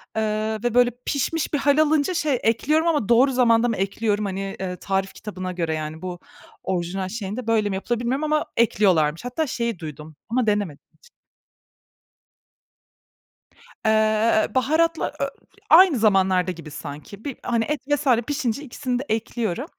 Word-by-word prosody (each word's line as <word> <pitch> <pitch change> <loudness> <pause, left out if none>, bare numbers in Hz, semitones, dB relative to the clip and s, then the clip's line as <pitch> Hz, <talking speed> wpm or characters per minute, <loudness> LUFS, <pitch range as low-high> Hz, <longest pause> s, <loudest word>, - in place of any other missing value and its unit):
eee, 215 0 -1
ve 240 -2 0
böyle 245 0 +4
pişmiş 305 +4 -1
bir 295 - +3
hâl 285 +1 +3
alınca 310 +2 +2
şey, 300 -7 0
ekliyorum 300 +9 +2
ama 295 -11 +1
doğru 250 +4 +5
zamanda 240 -2 +3
mı 230 - -1
ekliyorum 205 +2 -1
hani, 195 0 -4
eee, 185 -1 -3
tarif 195 +1 -2
kitabına 185 -3 -6
göre 170 -3 -2
yani, 155 +1 -5
bu 180 -1 -6 0.4
orijinal 185 +1 -2
şeyinde 215 +3 -5
böyle 220 -2 +2
mi 195 - -2
yapılır 225 +4 -2
bilmiyorum 255 +5 -1
ama 305 0 +1
ekliyorlarmış. 185 -7 +2
Hatta 275 +6 -2
şeyi 235 -6 -2
duydum 155 0 -9
ama 240 0 0
denemedim 205 -8 -1
hiç. 480 - -23 2.8
Eee, 220 0 +3
baharatla 320 +5 +1
ö - - +2 0.3
i - - -20
aynı 340 -2 +7
zamanlarda 190 -3 +3
gibi 165 -3 -10
sanki. 150 +8 -9
Bir 280 -4 -4
hani 235 -2 0
et 300 -1 -2
vs. 290 0 0 0.2
pişince 280 -2 -2
ikisini 250 -1 -3
de - - -3
ekliyorum. 225 +1 -2
220 Hz, 155 wpm, -23 LUFS, 190-260 Hz, 2.8 s, aynı